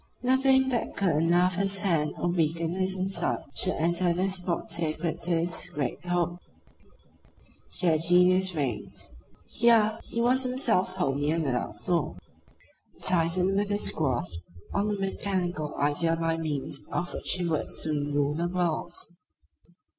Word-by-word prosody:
Nothing 265 +1 +3
that 240 -3 -2
could 195 -2 +2
unnerve 170 +4 +2
his 195 +1 0
hand 165 -6 0
or 175 - -1
weaken 165 -1 0
his 190 0 +2
insight 190 +1 0 0.2
should 185 - +2
enter 170 +2 +1
this 190 +2 0
spot 175 -2 -3
sacred 165 0 -2
to 175 - -1
his 170 0 0
great 140 0 -4
hope. 175 0 -1 1.3
Here 165 -4 +1
genius 180 +2 +5
reigned. 130 - -4 0.4
Here 225 -2 +3
he 230 - -6
was 250 +3 +3
himself 245 -8 +1
wholly 140 -2 -1
and 165 +1 0
without 125 -4 -3
flaw; 170 -5 -1 0.8
a - - -23
Titan 180 +2 +3
with 200 0 0
his 205 0 +2
grasp 120 - -2 0.3
on 200 +1 0
a - - 0
mechanical 185 -5 -3
idea 150 +3 +1
by 165 0 -1
means 150 -3 -3
of 175 0 -3
which - - 0
he 180 -2 -1
would 160 -3 -2
soon 145 -2 +1
rule 145 0 +1
the 170 +3 -1
world. 175 -1 -2
175 Hz, 145 wpm, -27 LUFS, 160-190 Hz, 1.3 s, genius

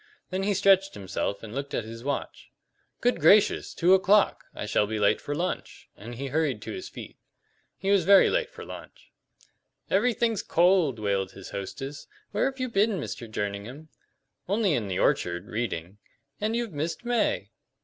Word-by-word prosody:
Then 185 +1 -1
he 200 +1 +1
stretched 195 0 +4
himself 100 +1 -3
and 110 -1 -8
looked 140 +2 -4
at - - -1
his 115 +1 -9
watch. 140 +1 -4 0.5
"Good 245 +1 +2
gracious, 210 +1 +5
two 180 +2 +3
o'clock! 195 +2 +4
I - - -4
shall 105 0 +1
be 110 +1 -3
late 105 -1 +2
for 145 - -4
lunch!" 175 +4 -4
and 120 +3 -9
he 135 +4 -5
hurried 145 -5 0
to - - -6
his 370 -1 -6
feet. - - -10 0.6
He 195 - -1
was 200 -3 +4
very 195 +3 +7
late - - 0
for - - -10
lunch. - - -11 0.8
"Everything's 235 -3 +2
cold," 170 -7 +3
wailed 100 -3 -1
his 95 -1 -10
hostess. 135 +9 -6 0.2
"Where - - +1
have 265 0 -2
you 255 - -1
been, 210 -3 +1
Mr. 120 -5 -6
Jerningham?" 110 +9 -5 0.6
"Only 200 -3 +2
in 115 -7 -1
the 95 - -2
orchard 85 +2 +1
reading." 105 -4 -4 0.4
"And 215 +2 -1
you've 235 -5 -2
missed 160 +9 -3
May!" 240 -1 0
155 Hz, 170 wpm, -27 LUFS, -, 0.8 s, very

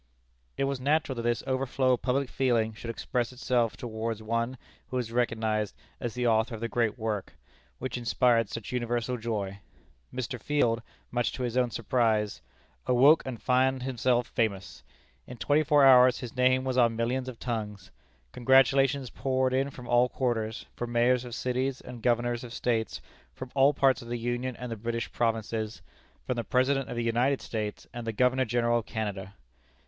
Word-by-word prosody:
It - - 0
was 135 -1 -1
natural 145 0 +1
that - - -2
this 120 0 0
overflow 130 0 +1
of 125 - -1
public 135 +1 0
feeling 120 -4 +1
should 115 +2 -8
express 120 +1 -2
itself 120 -2 0
towards 110 -1 -4
one 115 +3 -1 0.3
who 130 - -3
was 120 -3 -3
recognized 110 -3 0 0.2
as 120 -1 -4
the 125 0 -1
author 115 0 +2
of - - -8
the 115 - -1
great 115 0 0
work, 110 -4 -3 0.4
which 130 -1 -4
inspired 120 -2 +2
such 115 - -6
universal 120 0 -1
joy. 105 -4 -3 0.5
Mr. 125 -1 -4
Field, 120 -6 +1 0.3
much 120 0 0
to 130 - -4
his 120 -1 -2
own 125 -1 +2
surprise, 110 -2 0 0.5
"awoke 135 +6 +6
and 125 -4 -5
found 130 0 +2
himself 125 -1 +1
famous." 100 -6 -2 0.5
In 125 - -9
twenty 145 +5 +2
four 145 -2 +5
hours 125 -2 +7
his 125 -2 -7
name 130 0 +3
was 130 -1 0
on 115 -2 +4
millions 125 +3 -1
of 125 - -9
tongues. 105 -6 -5 0.4
Congratulations 135 +1 +3
poured 130 -1 0
in 135 +2 +1
from 125 -3 -11
all 120 +1 +4
quarters, 115 -4 -2
from 120 0 -5
mayors 120 +1 +3
of 120 -1 -6
cities 130 +1 -1
and 120 -2 -10
governors 120 0 +1
of 120 -1 -8
States; 115 -2 -1 0.3
from 130 -1 -8
all 140 +1 +5
parts 135 -3 +2
of 120 - -11
the 120 0 -3
Union 120 +2 -2
and 125 0 -7
the - - -2
British 115 +2 -3
Provinces; 110 -1 -2 0.4
from 125 - -2
the 120 - -1
President 135 +2 +1
of - - -4
the 120 - -1
United 120 +4 +1
States 105 -2 -4
and 120 -1 -6
the - - 0
Governor 125 +3 +2
General 120 0 +1
of 115 - -9
Canada. 100 -3 -4
120 Hz, 180 wpm, -28 LUFS, 115-130 Hz, 0.5 s, hours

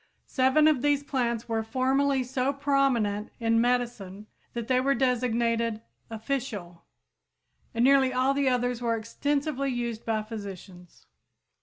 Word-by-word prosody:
Seven 265 +3 +3
of 300 -5 +3
these 290 0 +2
plants 240 -5 -2
were 225 -1 -1
formerly 265 +4 +1
so 260 +1 -1
prominent 270 -7 +1
in 230 -1 +2
medicine 235 -5 -1 0.3
that 235 -1 -4
they 255 -1 +2
were 275 +1 +2
designated 235 -3 0 0.3
"official" 220 -7 -5 0.9
and 230 +2 +1
nearly 270 -1 +5
all 255 +2 +2
the 275 -1 +1
others 245 -1 0
were 230 -1 +1
extensively 275 +4 -2
used 235 -3 -3
by 220 -1 -1
physicians. 195 -5 -10
245 Hz, 130 wpm, -27 LUFS, 225-270 Hz, 0.9 s, nearly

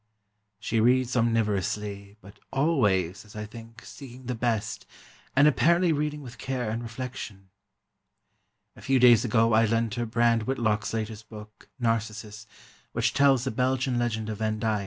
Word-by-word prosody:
She 115 0 -1
reads 125 +2 +3
omnivorously, 105 -3 -1
but 100 +2 -15
always, 105 - +1
as 105 -1 -16
I 105 0 -5
think, 115 +1 -12
seeking 130 -2 -11
the 125 - -2
best, 115 -2 -2 0.5
and 140 +3 +6
apparently 170 +3 +3
reading 150 0 -2
with 120 -2 -11
care 125 -4 -3
and 115 +2 -3
reflection. 115 -5 -7 1.2
A - - -14
few 135 0 +2
days 120 -3 +6
ago 115 -1 +2
I 110 +1 +5
lent 115 0 0
her 120 -1 -2
Brand 115 0 +2
Whitlock's 115 -5 0
latest 110 -1 -5
book, 105 -1 -12
"Narcissus," 110 -2 -2 0.5
which 115 +1 0
tells 135 -3 +4
a 130 - -1
Belgian 130 +1 0
legend 110 -2 -2
of 105 -1 -5
Van 110 -1 -1
Dyck. 110 -1 0
115 Hz, 155 wpm, -27 LUFS, 110-125 Hz, 1.2 s, and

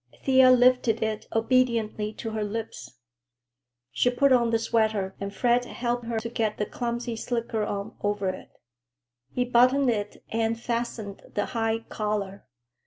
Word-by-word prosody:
Thea 260 -1 +6
lifted 250 -2 +4
it 220 -1 -3
obediently 225 -3 +1
to 225 - -6
her 220 -1 -2
lips. 220 +2 -6 1.0
She 245 - +2
put 265 +2 +3
on 240 -2 +3
the 230 - +3
sweater 220 -4 0
and 200 0 -3
Fred 245 +4 +2
helped 240 0 -3
her 230 -1 -2
to 230 - -4
get 225 -2 -1
the 210 - -1
clumsy 235 0 -3
slicker 230 -1 -2
on 200 -1 -4
over 205 -2 0
it. 185 - -7 0.8
He 250 - -1
buttoned 250 +2 +4
it 210 -2 -4
and 225 0 0
fastened 230 -4 -4
the 205 - +1
high 225 -1 0
collar. 205 -2 -3
225 Hz, 150 wpm, -26 LUFS, 210-245 Hz, 1.0 s, Thea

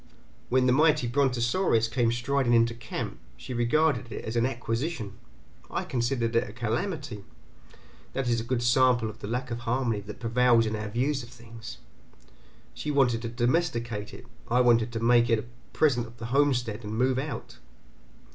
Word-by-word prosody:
When 130 +1 +3
the 125 - +4
mighty 150 -2 +4
brontosaurus 120 - +2
came 115 0 +1
striding 120 +1 +1
into 115 0 +4
camp, 115 - -6 0.2
she 130 - -7
regarded 125 0 +1
it - - -6
as 110 - -4
an 120 +1 +3
acquisition, 120 -1 -3 0.6
I - - -2
considered 120 -1 -1
it 115 - +2
a - - -10
calamity; 120 - -3 0.9
that 135 -2 -2
is 115 -1 +1
a - - -5
good 120 0 -1
sample 120 -2 +3
of 110 - -18
the - - -6
lack 125 +3 -3
of 120 - -3
harmony 120 -2 -1
that 105 +1 -9
prevails 120 0 +3
in 110 0 -2
our 105 0 -4
views 130 +6 0
of 120 - -11
things. 115 -2 -11 1.0
She 150 - -5
wanted 125 -5 +2
to 115 - -4
domesticate 120 -4 -1
it, - - -11 0.2
I 120 +2 +3
wanted 120 -1 +3
to 115 - -2
make 120 0 +4
it 115 - +4
a 110 - -5 0.3
present 125 -7 +2
of 115 +1 -16
the 115 - -7
homestead 125 -6 +1
and 105 +1 -5
move 130 +1 +2
out. 135 -4 -6
120 Hz, 175 wpm, -27 LUFS, 115-130 Hz, 1.0 s, the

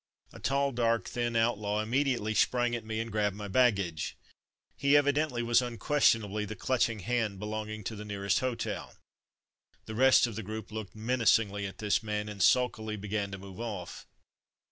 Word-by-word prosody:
A - - -11
tall, 140 0 +1
dark, 115 -2 +1
thin 120 -1 -2
outlaw 105 -2 +1
im 110 - -7
mediately 125 -5 +1
sprang 120 +2 +2
at 120 -2 -3
me, 110 0 -4
and 115 0 -4
grabbed 105 -2 0
my 105 0 -6
baggage. 100 -7 +1 0.6
He 140 +1 +4
evidently 145 -3 +1
was 120 +1 +4
unquestion 120 -1 +2
ably 105 +1 -3
the 110 +1 -5
clutching 115 -1 0
hand 115 -2 -1
belonging 110 +1 -5
to 110 - -4
the 105 - -7
nearest 100 -2 0
hotel. 130 -2 -3 0.9
The 110 - -7
rest 130 +3 +5
of 115 -3 -5
the 110 - -3
group 110 +1 -7
looked 110 -2 -6
menacingly 110 -3 +2
at 95 - -10
this 105 -2 +1
man, 105 -1 -3
and 100 -2 -6
sullenly 110 -4 +2
began 105 0 -3
to 95 - -6
move 95 +1 -11
off. 105 -7 -6
110 Hz, 175 wpm, -30 LUFS, 105-120 Hz, 0.9 s, rest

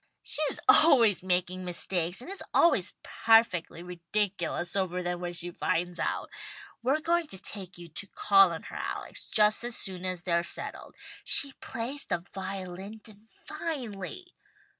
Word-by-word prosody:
"She's 305 -2 +1
always 280 - +6
making 185 0 0
mistakes, 180 +1 0
and 295 - -9
is 395 - -4
always 220 - +4
perfectly 225 -7 +2
ridiculous 180 0 -2
over 180 -2 -1
them 175 0 -2
when 175 0 -3
she 175 +1 -3
finds 175 +1 -1
it - - +1
out. - - -3 0.5
We're 270 +6 +1
going 340 0 +1
to 190 - -7
take 190 -2 -7
you 175 -1 -10
to 175 +5 -6
call 195 -2 +5
on 165 - -6
her, - - -10
Alex, - - -5
just 215 0 +3
as 240 0 -4
soon 185 -2 -5
as 185 -2 -3
they're 170 -1 +2
settled. 170 - -7 0.3
She 280 -1 +3
plays 255 +5 -4
the 170 +1 -2
violin 190 +2 -6
divinely." 225 - -7
195 Hz, 150 wpm, -29 LUFS, 175-230 Hz, 0.5 s, always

